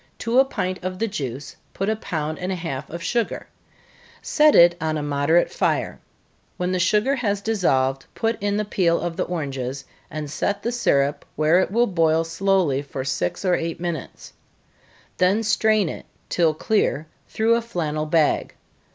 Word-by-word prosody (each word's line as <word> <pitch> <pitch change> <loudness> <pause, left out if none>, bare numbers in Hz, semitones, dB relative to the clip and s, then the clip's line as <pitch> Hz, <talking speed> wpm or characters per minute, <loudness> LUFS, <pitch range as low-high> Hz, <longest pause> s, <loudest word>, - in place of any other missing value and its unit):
To 235 +2 +1
a 270 - +6
pint 185 -8 -3
of 185 0 -3
the 225 - 0
juice, 140 - -5 0.2
put 195 - -2
a 220 - +1
pound 155 -7 -4
and 180 +1 -3
a - - -1
half 150 -6 -5
of 170 +1 -7
sugar 235 +3 -1 0.7
set 300 -1 +4
it 170 0 +7
on 155 -1 -1
a 150 - -3
moderate 145 +4 +2
fire - - -1 0.6
when 180 0 -1
the 185 - 0
sugar 210 +8 +2
has 205 -5 0
dissolved, 135 -11 0
put 225 0 0
in 205 0 0
the 210 - -1
peel 175 -4 +1
of 175 -1 -3
the - - -1
oranges, 135 -5 -4 0.2
and 155 -1 -5
set 200 +5 -2
the 235 - -1
syrup 145 - +1
where 155 +4 +4
it 185 - +1
will 235 +5 +3
boil 165 -5 +2
slowly 165 -4 +1
for 140 -2 -6
six 130 - -2
or 180 - +3
eight 165 -1 -2
minutes 170 -4 -6 0.8
then 195 +5 +2
strain 215 -2 +2
it, - - -7 0.2
till 165 -3 +2
clear, 160 -4 0 0.2
through 225 +1 +2
a 235 - +2
flannel 155 -9 -3
bag. 155 -1 +1
175 Hz, 175 wpm, -23 LUFS, 150-205 Hz, 0.8 s, it